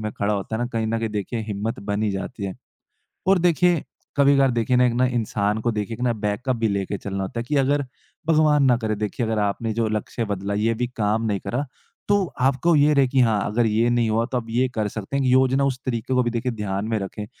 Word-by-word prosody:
में 110 0 -3
खड़ा 105 +1 0
होता 100 +3 -3
है 120 - -2
ना - - 0
कहीं 110 -1 0
न 115 +1 0
कहीं 110 +2 -3
हिम्मत 105 +1 -3
बन 100 +1 0
ही 105 - +1
जाती 100 +3 -5
है। 95 -1 -4 0.7
और 190 0 +5
देखिए 175 -1 +3 0.3
कभी-कभार 140 -1 +5
देखिए 120 +1 +1
ना 125 0 +5 0.2
एक 125 - -2
इंसान 105 -2 0
को 120 - 0
देखिए 105 +2 -3
एक 115 - -11
ना 120 -1 +2
बैकअप 110 +4 -2
भी 115 -1 +1
लेके 100 0 -2
चलना 95 -1 -4
होता 115 +5 -4
है - - -4
कि 145 +4 -1
अगर 140 +1 +2 0.4
भगवान 155 -3 +4
ना 125 -2 +5
करे 110 -2 -2
देखिए 105 +3 -2
अगर 110 -1 -1
आपने 105 +2 -1
जो 115 -1 +1
लक्ष्य 110 +2 -2
बदला, 100 -1 -3
ये 110 +2 +1
भी 125 +2 -1
काम 110 +1 +1
नहीं 100 -3 -1
करा। 140 +4 -1 0.4
तो 205 -1 +3 0.2
आपको 135 +6 +3
ये 150 +1 +5
रहे 140 -2 +4
कि 130 +1 +2
हाँ, 110 -4 +3
अगर 115 +2 +1
ये 110 +2 +2
नहीं 120 -2 +2
हुआ 115 +2 +2
तो 125 - +1
आप 115 - -6
ये 125 +3 +2
कर 110 -2 0
सकते 110 +6 -5
हैं 140 - +1
कि 125 - +3
योजना 130 +1 +3
उस 130 -2 0
तरीके 120 +1 -1
को 125 - +4
भी 120 - -1 0.2
ध्यान 105 -3 -3
में 110 -1 0
रखें। 105 +2 -6
115 Hz, 245 wpm, -23 LUFS, 105-130 Hz, 0.7 s, और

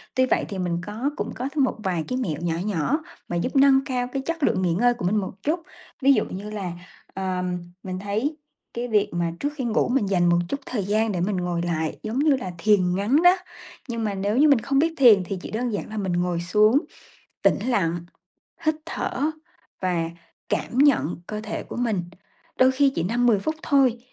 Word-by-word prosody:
Tuy 260 0 +4
vậy - - +1
thì 195 -2 -4
mình 175 -1 -1
có 225 +7 -2
cũng - - -3
có 260 +3 -3
thêm 285 - +3
một 260 - +1
vài 175 -4 -1
cái 255 - -2
mẹo 165 - -2
nhỏ 170 -1 -1
nhỏ 210 - 0 0.3
mà 175 - -3
giúp 250 +11 -2
nâng 270 0 +6
cao 250 -2 -1
cái 270 - -1
chất 330 -2 -3
lượng 185 - +2
nghỉ 175 -2 +1
ngơi 245 +6 +3
của 235 -7 -5
mình 190 +4 +2
một 200 -3 -1
chút. 320 +4 +1 0.4
Ví 275 +1 +6
dụ 215 - +1
như 200 +3 -7
là, 195 -5 -4 0.4
ờm, 180 -1 -2 0.3
mình 185 -1 -4
thấy 220 +10 -2 0.4
cái 240 +1 -3
việc 210 -3 +2
mà 170 -1 -1
trước 290 - 0
khi 275 - -3
ngủ 235 -2 +1
mình 250 -4 +2
dành 180 -3 +2
một 175 - +4
chút 280 - -2
thời 215 -6 -2
gian 215 +2 +1
để 175 -2 -2
mình 195 0 0
ngồi 175 -1 -1
lại, 160 -2 -2
giống 225 +5 -2
như 295 -2 +4
là 215 -8 -5
thiền 180 -1 +3
ngắn 235 - +2
đó, 355 +2 +6 0.5
nhưng 230 -2 -3
mà 210 -2 -1
nếu 200 +4 -1
như 300 +2 +6
mình 275 -5 +5
không 275 +3 +1
biết 325 +2 +2
thiền 220 -8 +7
thì 190 +2 -4
chỉ - - -8
đơn 240 +3 -1
giản 205 - -4
là 215 - -6
mình 190 -3 -1
ngồi 175 0 0
xuống, 210 +8 +4 0.6
tĩnh - - +4
lặng, 175 -8 +1 0.7
hít 310 - +4
thở 295 +3 -1 0.5
và 170 -3 0 0.4
cảm 245 - -2
nhận 275 - +4
cơ 215 0 -4
thể 215 0 -5
của - - -8
mình. 225 -7 0 0.6
Đôi 255 0 +6
khi 275 +1 +3
chỉ - - -1
5-10 235 +3 +2
phút 315 +11 -2
thôi, 265 -5 +3
215 Hz, 220 wpm, -24 LUFS, 180-260 Hz, 0.7 s, thiền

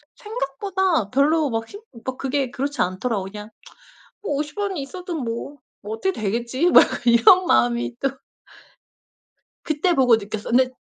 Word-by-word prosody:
생각보다 380 - -2
별로 295 +3 +2
막 225 -1 -3
힘 410 - -11 0.2
막 260 0 -4
그게 270 -1 -2
그렇지 285 +3 -3
않더라고요. 190 +1 -2
그냥 210 +1 -9 0.7
뭐 350 - -2
50원이 360 +5 -3
있어도 360 +5 -7
뭐, 250 +2 -5 0.2
뭐 210 +2 -5
어떻게 380 +13 -1
되겠지 235 - -1
막 - - +8 0.2
이런 240 +11 +6
마음이 240 -5 +2
또 275 - +1 1.5
그때 320 +3 +1
보고 255 -6 +5
느꼈어요. 210 0 -5
근데 255 0 +4
270 Hz, 290 characters per minute, -22 LUFS, 230-340 Hz, 1.5 s, 막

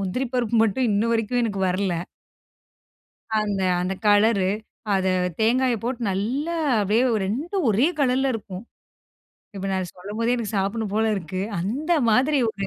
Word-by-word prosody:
முந்திரி 200 +8 -2
பருப்பு 235 -2 +1
மட்டும் 235 +3 0
இன்னு 210 +3 +1
வரைக்கும் 230 +2 0
எனக்கு 200 -3 -2
வரல. 185 -1 0 1.5
அந்த 205 -2 -1 0.2
அந்த 185 +2 -1
கலரு, 205 -2 +4 0.5
அத 190 0 +1 0.3
தேங்காயப் 240 0 +2
போட்டு 245 0 -2
நல்லா 265 - -2 0.2
அப்டியே 210 +5 +2
ஒ - - +2
2ம் 310 - -2
ஒரே 240 - +3
கலர்ல 265 0 +2
இருக்கும். 200 -1 -7 0.9
இப்ப 195 0 -4
நான் 185 -2 -2
சொல்லம் 200 +4 -8
போதே 235 +2 +2
எனக்குச் 225 -2 -4
சாப்ட்ணும் 200 +2 -1
போல 220 +1 +2
இருக்கு. 185 +1 -4 0.2
அந்த 275 - -1 0.2
மாதிரி 270 +6 +3
ஒரு 200 - -15
220 Hz, 145 wpm, -23 LUFS, 195-250 Hz, 1.5 s, கலரு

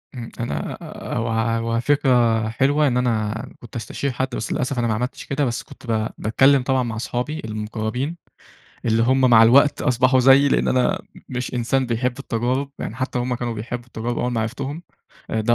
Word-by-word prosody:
امم. 120 -2 -6
أنا، 120 - -3
آآ، - - -7
هو 115 0 -1
هو 115 0 0
فكرة 120 -5 +2
حلوة 145 +6 +2
إن 125 -2 +1
أنا 110 -3 0
كنت 120 +2 -13
استشير 120 +5 -3
حد، 130 +1 -1
بس 110 - -4
للأسف 125 0 -1
أنا 120 - +1
ما 110 - +1
عملتش 125 +4 -3
كده، 140 +1 0
بس 120 -2 -2
كنت - - -15
ب 110 -1 +1
باتكلم 135 +4 +4
طبعًا 130 0 +1
مع 115 -2 -4
أصحابي 125 +7 -3
المقربين، 110 +7 -3 0.7
اللي 115 0 +2
هُم 130 +3 +3
مع 120 -4 +7
الوقت 140 +6 +5
أصبحوا 130 -1 +3
زييِّ 135 +2 +6
لأن - - +2
أنا 130 -1 +2 0.3
مش 125 0 -4
إنسان 125 +2 +1
بيحب 120 +2 -1
التجارب، 130 +2 -1
يعني 110 - -5
حتى 130 0 -2
هُم 125 +1 -1
كانوا 120 -1 -3
بيحبّوا 120 +2 -5
التجارب 120 0 -4
أول 125 0 -1
ما 115 - 0
عرفتهم، 140 +8 -4 0.5
ده 110 +1 +2
120 Hz, 185 wpm, -22 LUFS, 115-130 Hz, 0.7 s, مع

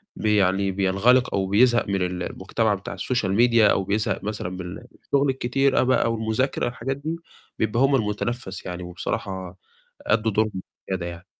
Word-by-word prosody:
بي 105 -1 +1
يعني 95 0 +2
بينغلق 100 +7 +3
أو 95 -1 0
بيزهق 120 +4 +4
من 95 -1 0
ال 90 0 -2
المجتمع 105 +3 -1
بتاع 100 - -6
الSocial 120 -6 -1
Media 120 -1 +5
أو 95 - +1
بيزهق 105 0 -1
مثلًا 105 -3 -3
من 90 -1 -6
الشُّغل 140 0 -1
الكتير 135 +1 +1
أ - - +3
بقى 125 -2 +2
والمذاكرة 110 +4 -1
والحاجات 125 +2 -3
دي، 155 +4 -3 0.4
بيبقى 110 +1 0
هُم 135 0 +4
المُتنفس 105 -3 -3
يعني، 90 0 -5
وبصراحة 90 +1 -5 0.4
أدّوا 110 +1 +1
دورهم 105 -2 0 0.3
وزيادة 95 -2 -2
يعني. 85 +1 -8
105 Hz, 165 wpm, -24 LUFS, 95-120 Hz, 0.4 s, Media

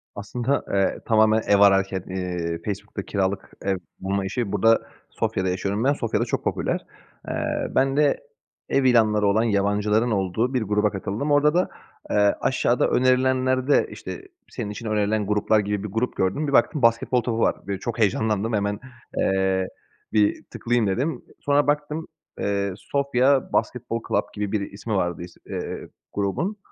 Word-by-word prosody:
Aslında, 120 +7 -1
eee, 95 -1 +1
tamamen 110 0 +4
ev 100 - +5
ararken, 95 -2 +4
eee, 90 -3 -3
Facebook'ta 100 -1 -4
kiralık 95 0 -2
ev 95 -1 0 0.2
bulma 95 +1 -1
işi 100 +1 -2
burada, 115 +3 +4 0.3
Sofya'da 95 0 -1
yaşıyorum 100 +4 -1
ben, 140 +2 +4
Sofya'da 115 -6 -1
çok - - -2
popüler. - - -1 0.5
Eee, - - -2
ben 135 +1 +2
de 150 -1 +3 0.5
ev 135 - +2
ilanları 110 -5 +4
olan 105 +3 +3
yabancıların 105 +2 +1
olduğu 105 +5 0
bir 125 - +1
gruba 105 0 +1
katıldım. 100 +9 -3
Orada 145 +1 +4
da, 180 +2 +2 0.4
eee, 105 -1 +3
aşağıda 125 -1 +2
önerilenlerde, 130 +1 +3
işte, 380 - -8 0.2
"senin 115 -5 -5
için 105 +3 -7
önerilen 105 -1 0
gruplar" 105 +1 +2
gibi 105 -1 -2
bir 105 - -4
grup 115 +5 -1
gördüm. 95 +12 0
Bir 140 - -2
baktım, 150 +1 +3
basketbol 115 +1 +3
topu 115 -1 -2
var, - - +3
böyle 100 -1 -3
çok 120 +3 -4
heyecanlandım 110 +1 +1
hemen, 100 0 0 0.4
eee, 95 -1 +1 0.5
bir 105 -1 +2
tıklayayım, 120 -2 -1
dedim. 130 +8 -1 0.2
Sonra 145 0 +2
baktım, 150 +2 -1 0.3
eee, 100 -1 -1
"Sofia 135 +4 +1
Basketbol 120 -1 -1
Club" - - +2
gibi 105 -1 -3
bir 100 -2 -2
ismi 105 +3 -5
vardı 85 -3 -1
is 90 - -11
eee, - - -5 0.3
grubun. 130 - -1
105 Hz, 155 wpm, -24 LUFS, 100-125 Hz, 0.5 s, ev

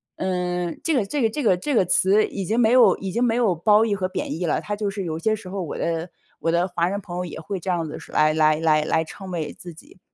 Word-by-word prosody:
嗯， 180 -2 -2
这 325 - +1
个 220 -6 +1
这 275 +7 -2
个 225 - +3
这 285 +5 -4
个 185 -5 +3
这 285 +7 -2
个 190 - +4
词 195 +5 +3
已 195 - -5
经 225 +6 0
没 225 -1 +4
有 255 -1 +6
已 190 -1 -5
经 235 +5 0
没 230 -1 +2
有 230 -7 +2
褒 210 +6 +4
义 205 -2 0
和 185 -1 -1
贬 - - -4
义 180 - -1
了， - - 0
它 205 - -4
就 205 -1 -2
是 195 -1 -4
有 160 -1 -4
些 215 +5 +1
时 200 -4 -10
候， 195 0 -4
我 165 - -5
的 165 +1 -2 0.3
我 165 - 0
的 175 +2 +2
华 170 -1 0
人 200 +2 -2
朋 175 -1 -7
友 180 - -2
也 165 - -7
会 185 +4 -5
这 185 - -6
样 170 -2 0
子 150 - -7
是 - - -14
来 155 0 +3
来 155 -1 +4
来 155 -2 +3
来 160 +1 +1
称 190 +4 -10
谓 160 -4 -3
自 175 -2 -11
己。 165 - -17
185 Hz, 315 characters per minute, -23 LUFS, 170-210 Hz, 0.3 s, 有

